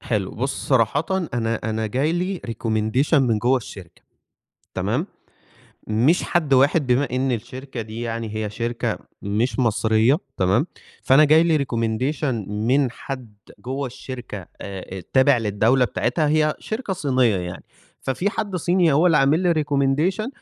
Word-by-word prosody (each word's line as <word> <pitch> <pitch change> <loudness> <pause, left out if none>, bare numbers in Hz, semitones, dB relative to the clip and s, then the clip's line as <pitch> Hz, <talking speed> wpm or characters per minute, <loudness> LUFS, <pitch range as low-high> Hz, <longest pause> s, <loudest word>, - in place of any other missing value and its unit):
حلو، 105 -5 -2
بُصّ 135 +4 -4
صراحةً، 130 +3 +2 0.3
أنا 115 -1 0
أنا 110 0 -1
جاي 135 +9 0
لي 180 +1 -2
recommendation 115 +5 0
من 125 -7 +3
جوّه 125 +5 +2
الشركة، 95 -7 -9 0.7
تمام، - - -1 0.8
مش 120 +11 +3
حد 155 -6 +1
واحد 140 +3 +3
بما 130 +3 +2
إن 130 +1 0
الشركة 125 +2 -6
دي 110 +1 -8
يعني 115 -2 -4
هي 110 -1 -2
شركة 115 +2 -2 0.2
مش 105 +7 -1
مصرية، 115 +2 +3 0.2
تمام، 95 - +2 0.4
فأنا 135 +4 +6
جاي 155 +2 +5
لي 165 -2 +3
recommendation 120 -1 -1
من 120 +6 +1
حد 125 -3 -8 0.2
جوّه 135 +2 -4
الشركة 120 -6 -8
آآ، 95 -1 -7
تابع 130 0 +5
للدولة 115 +4 +2
بتاعتها، 155 +5 0
هي 155 0 +2
شركة 220 -2 -4
صينية 130 - +2
يعني، 90 -1 -6 0.4
ففي 175 +10 -1
حد 205 -4 -3
صيني 175 -2 +2
هو 155 +6 +4
اللي 165 - +4
عامل 145 +4 +3
لي 170 -4 +2
recommendation 145 - +1
130 Hz, 145 wpm, -22 LUFS, 110-150 Hz, 0.8 s, فأنا